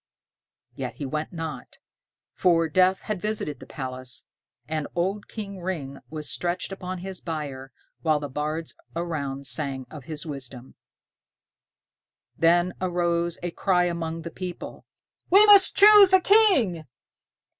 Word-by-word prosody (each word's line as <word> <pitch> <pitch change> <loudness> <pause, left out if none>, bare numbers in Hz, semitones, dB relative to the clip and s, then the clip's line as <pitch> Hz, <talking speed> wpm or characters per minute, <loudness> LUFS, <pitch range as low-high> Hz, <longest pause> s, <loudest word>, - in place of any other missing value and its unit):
Yet - - -5
he 145 - -5
went 150 +3 -3
not; 165 -2 -7 0.6
for 165 -2 +3
death 185 +4 +3
had 210 -4 -4
visited 210 -9 -3
the - - -12
palace, 130 -2 -5 0.4
and 155 -1 -2
old 190 +4 -1
King 200 -3 -7
Ring 150 -7 -4
was 155 -1 -5
stretched 175 +2 -2
upon 185 -1 -5
his 190 +1 -6
bier, 140 -5 -5 0.3
while 155 -2 +2
the 145 - -5
bards 155 +4 -4 0.2
around 145 -5 -3
sang 135 -3 -2
of 150 -5 -10
his 155 -1 -6
wisdom. 135 -4 -6 1.6
Then 175 +2 +3
arose 175 -2 0
a 175 - -2
cry 180 0 +2
among 165 -1 -3
the 170 - -6
people, 180 -1 -7 0.4
"We 400 +4 +7
must 405 -2 +7
choose 410 -1 +8
a 375 - +8
king!" 355 - +3
170 Hz, 135 wpm, -25 LUFS, 150-185 Hz, 1.6 s, choose